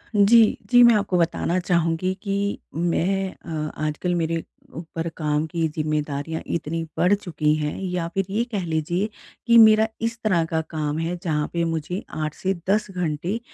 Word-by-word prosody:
जी, 215 +2 +6
जी, 245 - +7
मैं 235 -1 +7
आपको 200 -3 +1
बताना 170 +1 +1
चाहूँगी 175 +1 0
कि 200 0 -1 0.2
मैं 185 +3 0
अ, 155 -2 -3
आजकल 175 +4 -1
मेरे 165 -1 -1 0.3
ऊपर 165 0 -5
काम 150 0 0
की 165 0 -1
जिम्मेदारियाँ 150 0 -2
इतनी 165 0 -3
बढ़ 180 +3 +4
चुकी 160 -7 0
हैं 150 -1 -2
या 180 -3 -2
फिर 195 0 0
ये 215 +4 0
कह 200 -4 -2
लीजिए 170 +5 -1 0.4
कि 235 0 +6
मेरा 220 -1 +7 0.2
इस 230 0 -5
तरह 185 -6 +2
का 160 0 -1
काम 150 -2 -2
है 165 +2 -2
जहाँ 150 -3 0
पे 170 0 0
मुझे 165 +3 -3 0.2
8 155 0 -2
से 190 0 -1 0.2
10 210 +1 +2
घंटे 180 +3 -2
170 Hz, 170 wpm, -23 LUFS, 160-195 Hz, 0.4 s, जी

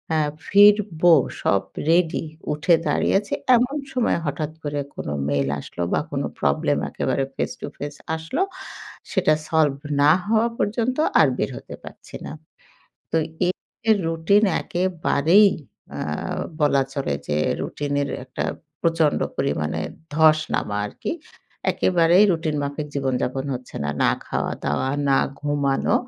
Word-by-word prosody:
আ - - +3 0.3
ফিরবো 200 -5 +5 0.3
সব 100 - +2 0.3
রেডি 170 -1 +2 0.3
উঠে 155 +3 +3
দাঁড়িয়ে - - +1
আছি 205 - -7 0.2
এমন 250 +5 +1 0.2
সময় 250 -7 +1
হঠাৎ 150 +1 -2
করে 145 -1 -2 0.2
কোন - - -6 0.2
মেইল 70 -1 +1
আসলো 85 - -8
বা - - +3
কোনো - - -1
প্রবলেম 70 0 +1
একেবারে 135 - -1
ফেস - - -2
টু - - -4
ফেস 145 0 -5 0.2
আসলো 160 - -3 0.7
সেটা 185 -6 +3 0.2
সলভ 150 -4 +2 0.2
না 145 +1 +7
হওয়া 220 +2 +3
পর্যন্ত 230 +4 0 0.2
আর 155 - +6
বের - - 0
হতে - - -9
পারছি - - -12
না। - - -6 0.8
তো - - 0 0.3
এই, 180 - +2 0.4
এই 220 - +7
রুটিন 165 +6 +3 0.2
একেবারেই 180 +1 +3 0.5
আ - - -5 0.6
বলা 145 -2 +4
চলে 135 - -2
যে 75 - -1 0.2
রুটিনের 145 -1 -2 0.2
একটা 130 - -4 0.4
প্রচণ্ড 165 -3 +2 0.2
পরিমাণে 80 - -1 0.3
ধস 155 -1 +6 0.2
নামা 105 - -1
আরকি 105 - -5 0.6
একেবারেই 175 +2 +4
রুটিন 160 -2 -1
মাফিক 145 +1 -3
জীবনযাপন 135 -1 -1
হচ্ছে 125 0 -8
না। 75 - 0
না - - +4 0.2
খাওয়া-দাওয়া, 75 - -2 0.2
না 135 - +4 0.2
ঘুমানো, 145 -2 0
155 Hz, 135 wpm, -23 LUFS, 140-180 Hz, 0.8 s, না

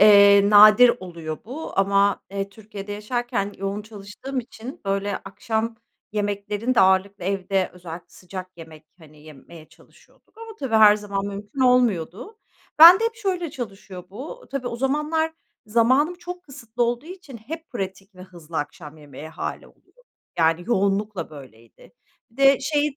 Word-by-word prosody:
eee, 200 -1 +7
nadir 215 +4 +8
oluyor 165 -4 -7
bu. 275 +4 -7
Ama, 200 0 +2
eee, 195 0 -3
Türkiye'de 205 -1 -9
yaşarken 210 -1 -3
yoğun 195 +2 -3
çalıştığım 215 +5 -7
için, 245 +5 -11
böyle, 200 0 -1
akşam 225 +1 -4 0.4
yemeklerini 205 +3 -2
de - - +4
ağırlıklı 190 0 +2
evde, 195 0 -1
özellikle 175 -1 -10
sıcak 185 0 -9
yemek, 160 -2 -13
hani, 155 -2 -18
yemeye 155 +2 -14
çalışıyorduk. - - -24
Ama, 455 0 -9
tabii, 265 -5 -3
her 210 -1 +7
zaman 200 -1 -4
mümkün 205 +6 -7
olmuyordu. 245 - +1 0.4
Ben 340 +5 +10
de - - +1
hep 460 0 -1
şöyle 370 -6 -2
çalışıyor 195 -7 -8
bu 295 - -9
tabii, 275 -3 -4
o 235 - -5
zamanlar 300 +5 0 0.3
zamanım 255 +9 +2
çok 355 0 -9
kısıtlı 245 -6 -5
olduğu 240 +5 -1
için 360 -8 -10
hep 320 +9 -9
pratik 195 -2 -6
ve 185 - -12
hızlı 170 -3 -11
akşam 150 +1 -7
yemeği 145 +1 -11
hâli 160 - -6
oluyor. - - -27 0.4
Yani 165 +1 +2
yoğunlukla 200 -4 -1
böyleydi. 125 -6 -15 0.4
Bir 230 - -26
de 275 -1 +5
şey 290 0 -1
205 Hz, 150 wpm, -23 LUFS, 190-255 Hz, 0.4 s, Ben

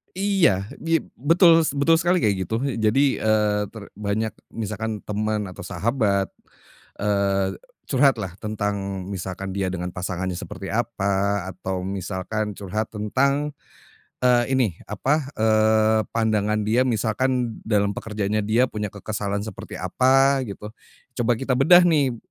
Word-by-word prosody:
Iya, 185 - +2
di 165 -1 +1 0.2
betul 165 +3 +5
betul 145 +4 +3
sekali 175 +2 +2
kayak 105 -7 +2
gitu. 110 +6 -3
Jadi, 130 +1 +2
eee, 105 -1 +1
ter 110 -3 -9
banyak 105 +1 -2 0.2
misalkan 110 0 -4
teman 105 -1 -1
atau 90 - -9
sahabat, 100 0 0 0.7
eee, 100 -2 +1 0.3
curhatlah 130 -9 +2
tentang 100 -3 -3
misalkan 95 0 -5
dia 95 -2 -1
dengan 90 -1 -3
pasangannya 90 0 -3
seperti 95 +1 -7
apa, 100 -4 0
atau 95 -1 -3
misalkan 100 +2 -3
curhat 105 +3 -3
tentang, 140 +7 0 0.7
eee, 120 -1 +5
ini, 125 -4 +3 0.2
apa, 135 +7 0
eee, 110 0 +3
pandangan 110 -2 +1
dia 115 +4 +3
misalkan 120 +2 0
dalam 100 -2 +1
pekerjaannya 105 0 -2
dia 110 +5 +3
punya 105 -4 -4
kekesalan 100 0 -4
seperti 110 - -8
apa, 135 +1 +3
gitu. 105 +1 -8 0.5
Coba 120 +1 +3
kita 135 0 -1
bedah 175 +7 +6
nih, 140 -7 +2
110 Hz, 125 wpm, -23 LUFS, 100-125 Hz, 0.7 s, bedah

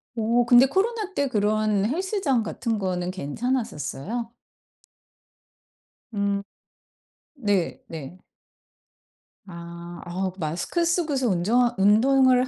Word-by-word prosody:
오 235 +1 +2
근데 245 +2 +7
코로나 405 - -1
때 285 -1 +1
그런 210 -2 +1
헬스장 325 - 0
같은 225 +1 -2
거는 180 -2 -2
괜찮았었어요? 220 - -3 1.8
음. 200 -1 0 0.9
네 205 -9 0
네. 160 +1 -8 1.3
아. 170 -1 -9
어 185 +2 -2
마스크 170 - -1
쓰고서 310 -7 +1
운전 230 +7 +2
운동을 255 +5 +4
220 Hz, 185 characters per minute, -25 LUFS, 185-260 Hz, 1.8 s, 근데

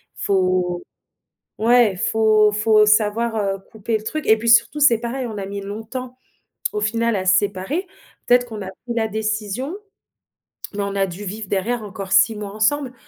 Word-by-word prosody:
faut 185 -2 0 0.8
ouais, 230 -2 +4
faut 215 +1 +3
faut 215 0 +4
savoir, 215 +2 +2
heu, 200 -2 -1
couper 220 +1 -2
le 215 - -12
truc 310 +7 -4
et 220 - +6
puis, 235 - -5
surtout 230 +6 +4
c'est 245 -6 +5
pareil, 245 +3 -4
on 215 -2 -7
a 195 - -5
mis 200 0 -5
longtemps, 225 +5 -7 0.6
au 210 - -2
final, 230 +1 0
à 185 -1 -3
se 185 +1 +5
séparer, 205 - -1 0.4
peut-être 245 0 +4
qu'on 215 -3 -6
a 190 - -6
pris 235 +6 -8
la 225 -1 0
décision, 215 - -3 1.0
mais 205 - -3
on 200 0 -4
a 195 -1 +2
dû 190 +2 -8
vivre 205 +2 -6
derrière 220 +4 -1
encore 200 -2 -8
6 195 +3 +5
mois 210 -1 -6
ensemble. 250 +5 0
215 Hz, 180 wpm, -21 LUFS, 200-235 Hz, 1.0 s, et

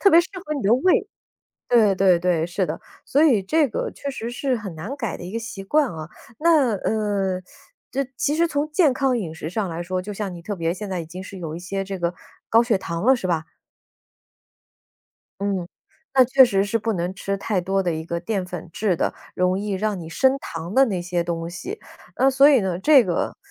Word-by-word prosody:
特 400 - +6
别 335 -3 +7
适 345 - -6 0.2
合 305 - -3
你 280 - -3
的 200 - +3
胃。 320 +9 +2 0.6
对 220 -5 +4
对 185 -2 +4
对， 170 -2 +1
是 180 +2 -1
的。 160 -1 -4 0.3
所 290 +3 +3
以 255 -10 +5
这 310 +10 +3
个 - - -2
确 280 - -6
实 235 -3 -5
是 255 +2 -1
很 205 -5 -7
难 195 - -5
改 230 -9 -3
的 - - -9
一 180 - -7
个 230 - -2
习 220 -4 -7
惯 290 +6 +2
啊， 155 0 -7 0.3
那， 300 -8 +4
呃， 200 -3 -1 0.5
这 275 +1 -1
其 295 +1 +1
实 335 +2 +3
从 295 -2 -1
健 310 -3 +4
康 260 -1 +1
饮 175 -8 -4
食 160 -1 -6
上 195 +1 -2
来 170 +1 -4
说 185 +1 -2
就 205 +3 -7
像 200 -2 -4
你 170 - -9
特 205 +5 -4
别 170 -2 -1
现 200 +2 -6
在 185 -2 -2
已 165 - -5
经 180 +4 -8
是 195 0 -9
有 160 -2 -5
一 - - -6
些 195 +2 -3
这 195 0 -4
个 175 -1 -1 0.4
高 225 - +6
血 235 -4 +2
糖 170 0 -4
了， 265 +1 +6
是 240 - -6
吧？ 165 -3 0 2.0
嗯， 195 -3 -1 0.5
那 260 -1 +7
确 260 +2 +7
实 195 -5 +2
是 220 +3 0
不 225 +1 -1
能 180 +1 -2
吃 200 +1 -3
太 200 -1 -1
多 195 +2 0
的 175 -2 0
一 160 0 -4
个 170 +1 -3
淀 195 +1 -2
粉 180 -1 -8
质 200 -5 0
的， - - -1 0.2
容 180 +1 +1
易 205 0 -3
让 205 +1 -1
你 160 - -8
升 265 +10 +2
糖 165 -4 -6
的 270 +1 +6
那 190 -6 -2
些 175 0 -1
东 165 -1 -3
西。 365 - -6 0.4
那 270 - +4
所 270 +2 +6
以 275 -4 +5
呢 185 -3 -2
这 270 +5 +6
个， 175 -2 -1
195 Hz, 245 characters per minute, -23 LUFS, 180-255 Hz, 2.0 s, 别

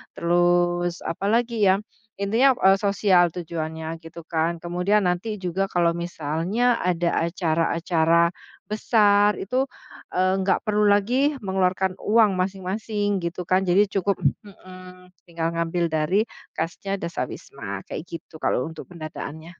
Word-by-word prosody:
Terus, 175 0 +1
apalagi 220 +4 +1
ya, 195 +2 +3 0.3
intinya, 230 +7 +3
eee, 195 +1 +6
sosial 200 -3 +3
tujuannya, 160 -1 -5
gitu 165 +1 -11
kan. 165 +1 -1
Kemudian 180 +4 +1
nanti 210 +5 -2
juga 190 +2 -1
kalau 175 -2 +2
misalnya 175 +8 0
ada 175 -1 0 0.2
acara-acara, 170 0 +2 0.4
besar 210 -1 +3
itu, 255 +7 -1 0.5
eee, 185 +1 +2
nggak 190 0 +1
perlu 210 0 +2
lagi 245 +9 +3
mengeluarkan 190 -1 0
uang 210 -3 +3
masing-masing, 200 +2 -1
gitu 170 +1 -4
kan, 185 +2 +1
jadi 185 +4 +5
cukup 195 0 +1 0.3
mhm, 185 -1 -14 0.2
tinggal 165 -1 -2
ngambil 170 0 -1
dari 160 +7 +2 0.3
kasnya 170 +5 -3
dasawisma, 110 - -6
kayak 165 - -7
gitu, 165 -1 -10
kalau 125 - 0
untuk 160 - -10
pendataannya. 160 0 -8
180 Hz, 125 wpm, -24 LUFS, 170-200 Hz, 0.5 s, eee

